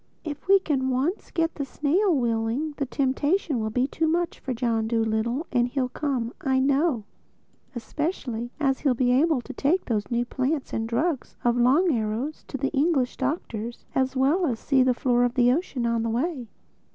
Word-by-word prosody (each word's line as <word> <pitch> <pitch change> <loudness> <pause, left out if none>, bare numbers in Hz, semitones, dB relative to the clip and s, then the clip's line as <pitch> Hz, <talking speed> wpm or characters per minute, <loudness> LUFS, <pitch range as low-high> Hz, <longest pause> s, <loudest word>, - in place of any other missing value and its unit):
If 300 0 -7
we 395 +1 +7
can 275 -8 -1
once 275 +10 -1
get 330 -1 0
the 285 - -3
snail 315 +9 +1
willing, 235 +4 0
the 280 - -2
temptation 285 +3 0
will 220 0 -1
be 250 +4 +1
too 320 +4 -1
much 340 +1 0
for 265 - -5
John 230 -2 0
Dolittle 225 +5 0
and 245 -2 +2
he'll 255 0 -1
come, 255 -5 -2
I 265 -1 +1
know—especially 265 - -3
as 270 -3 +1
he'll 270 -4 +2
be 245 0 +2
able 285 +1 +3
to 265 - -9
take 305 +9 +1
those 210 -5 -1
new 240 0 0
plants 270 +4 -2
and 225 0 -2
drugs 285 +4 -1
of 240 0 +3
Long 270 +9 +4
Arrow's 230 +6 -2
to 275 - -4
the 275 +1 -1
English 280 -3 +1
doctors, 240 -5 -3
as 265 0 0
well 295 +7 +2
as 240 -5 -1
see 270 +3 +2
the 255 -1 +3
floor 245 -1 +2
of 245 0 0
the 245 -1 +4
ocean 270 -4 -1
on 230 -1 +1
the 230 - -1
way." 255 +1 -2
260 Hz, 185 wpm, -25 LUFS, 240-300 Hz, -, we